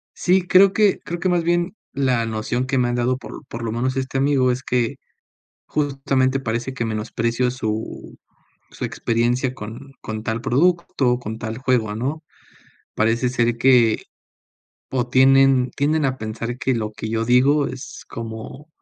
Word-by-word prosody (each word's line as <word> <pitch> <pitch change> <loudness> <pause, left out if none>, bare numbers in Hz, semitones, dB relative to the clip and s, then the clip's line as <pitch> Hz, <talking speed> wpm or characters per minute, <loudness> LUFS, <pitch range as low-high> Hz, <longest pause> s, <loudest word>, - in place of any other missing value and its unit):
Sí, 185 +1 +3
creo 190 +2 +6
que 210 -3 +3
creo 175 0 -6
que 185 +1 0
más 175 -2 +2
bien 175 +3 0 0.2
la 130 -4 +1
noción 115 +3 -2
que 135 - 0
me 125 -1 +2
han 120 - -1
dado 125 +1 +1
por 140 - -10
por 115 -1 -7
lo 110 - -2
menos 130 +3 -1
este 135 0 -2
amigo 135 -2 +3
es 130 +1 -3
que 120 -2 0 0.7
justamente 135 -2 0
parece 120 +1 -3
que 120 -3 -2
menosprecio 115 +3 -1
su 110 -3 -5 0.5
su - - -6
experiencia 120 +2 0
con 120 +4 -9
con 110 0 -5
tal 115 0 -2
producto, 135 -3 +1
con 110 -2 -6
tal 115 0 -5
juego, 125 -5 0
¿no? 140 +8 -3 0.7
Parece 115 +3 +1
ser 120 -2 +1
que, 120 -3 +4 0.9
o 125 -2 0
tienen 130 0 +5
tienden 150 +1 0
a 130 0 0
pensar 115 +3 -5
que 130 0 0
lo 110 -2 -3
que 110 - -6
yo 115 0 -1
digo 135 +5 +4
es 130 +1 -9
como 115 +6 -8
125 Hz, 165 wpm, -21 LUFS, 115-135 Hz, 0.9 s, creo